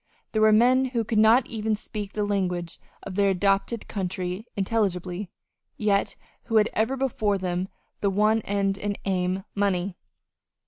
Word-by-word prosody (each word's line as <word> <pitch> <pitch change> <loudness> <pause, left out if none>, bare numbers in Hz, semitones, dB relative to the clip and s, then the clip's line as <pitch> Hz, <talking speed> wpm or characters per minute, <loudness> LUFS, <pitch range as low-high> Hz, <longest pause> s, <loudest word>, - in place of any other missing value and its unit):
There 215 - 0
were 215 0 +6
men 250 +4 +5
who 245 -3 -1
could 220 0 0
not 225 +3 +6
even 220 -1 -1
speak 205 -1 -6
the 210 - -1
language 180 -4 -2 0.2
of 200 - -6
their 200 +1 +3
adopted 195 +4 +1
country 185 +1 -4
intelligibly, 190 -2 -1 0.5
yet 205 -2 +1 0.3
who 225 - -2
had 215 0 +4
ever 225 +5 0
before 220 -6 0
them 185 0 -2 0.3
the 200 - +1
one 215 +3 +2
end 195 -1 -1
and 205 -1 -2
aim 185 0 0
money. 195 -2 0
205 Hz, 150 wpm, -26 LUFS, 190-220 Hz, 0.5 s, were